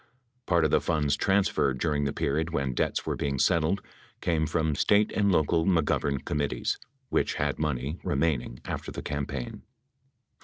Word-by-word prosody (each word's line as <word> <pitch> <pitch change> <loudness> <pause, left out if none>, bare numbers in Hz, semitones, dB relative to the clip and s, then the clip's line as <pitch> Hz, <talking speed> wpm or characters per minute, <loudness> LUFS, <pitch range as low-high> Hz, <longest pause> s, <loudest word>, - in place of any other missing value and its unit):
Part 85 -3 +3
of 80 - +1
the - - +4
funds 75 -3 +1
transferred 95 -9 +2
during 75 0 0
the 70 - 0
period 80 +5 -1
when 70 -5 -1
debts - - -1
were - - -1
being 70 -1 -2
settled 85 +6 +2 0.4
came: 80 -2 +1
from 80 -1 0
State 105 +8 +3
and 100 -1 +2
local 80 -1 +3
McGovern 75 -5 +1
com 75 - -1
mittees, 70 -1 -1 0.3
which - - +1
had - - -1
money 75 +1 -2
remaining 70 -5 -1
after - - -4
the - - -6
campaign. 70 -3 -4
75 Hz, 160 wpm, -28 LUFS, 70-85 Hz, 0.4 s, the